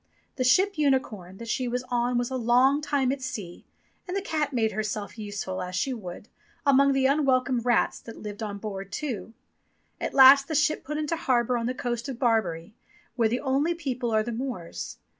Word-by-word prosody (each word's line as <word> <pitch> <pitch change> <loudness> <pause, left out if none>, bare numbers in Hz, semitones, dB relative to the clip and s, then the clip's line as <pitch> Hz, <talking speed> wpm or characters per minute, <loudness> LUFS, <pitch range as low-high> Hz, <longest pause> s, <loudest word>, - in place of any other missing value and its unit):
The 255 - +1
ship 365 +8 +3
Unicorn 220 -10 0
that 230 - -8
she 250 +3 -1
was 245 +1 -2
on 245 0 +1
was 240 +1 -1
a - - -2
long 255 +4 +3
time 285 -3 +1
at 275 0 -4
sea, 205 -9 -6 0.4
and 365 +2 -2
the - - -1
cat 305 -6 -1
made 225 -4 +1
herself 210 0 -4
useful, 205 -3 -5
as 180 0 -5
she 260 +8 0
would, 200 -3 -8 0.4
among 280 0 +5
the 270 -1 +2
unwelcome 265 -3 +2
rats 240 +1 +1
that 230 - -11
lived 210 0 -8
on 205 -2 -4
board 195 -2 -6
too. 230 -7 -5 0.6
At - - -4
last 275 +1 +8
the 315 - -3
ship 305 +1 +2
put 300 +3 -4
into 305 +2 -1
harbour 250 -5 +1
on 235 -1 -1
the 255 - -2
coast 240 +1 -3
of 260 - -5
Barbary, 215 -8 0 0.4
where 230 -3 +2
the 245 +3 -1
only 285 +5 +1
people 255 -7 -3
are 220 -1 +2
the 240 - -4
Moors. 225 - -5
245 Hz, 195 wpm, -26 LUFS, 215-275 Hz, 0.6 s, last